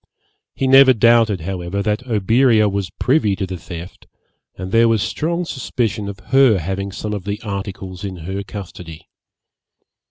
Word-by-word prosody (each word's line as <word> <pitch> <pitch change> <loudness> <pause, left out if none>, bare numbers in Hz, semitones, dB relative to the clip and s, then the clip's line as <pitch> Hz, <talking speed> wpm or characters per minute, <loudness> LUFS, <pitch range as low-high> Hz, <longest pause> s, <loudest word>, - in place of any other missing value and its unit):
He 135 - -1
never 135 0 +7
doubted, 115 -4 +3
however, 95 +2 -3
that 105 +5 -2
Oberea 110 +1 +3
was 100 -2 -2
privy 110 0 +1
to 95 +1 -3
the 95 0 -6
theft, 85 +1 -10 0.5
and 95 0 -7
there 115 +2 +5
was 110 -3 +2
strong 170 +3 -2
suspicion 115 -8 -3
of 100 - -8
her 135 -6 +6
having 95 +3 -4
some 105 +2 -5
of 100 -3 -4
the 105 +1 -4
articles 95 -2 -6
in 95 -2 -5
her 95 +2 -3
custody. 90 -5 -9
100 Hz, 155 wpm, -19 LUFS, 95-115 Hz, 0.5 s, never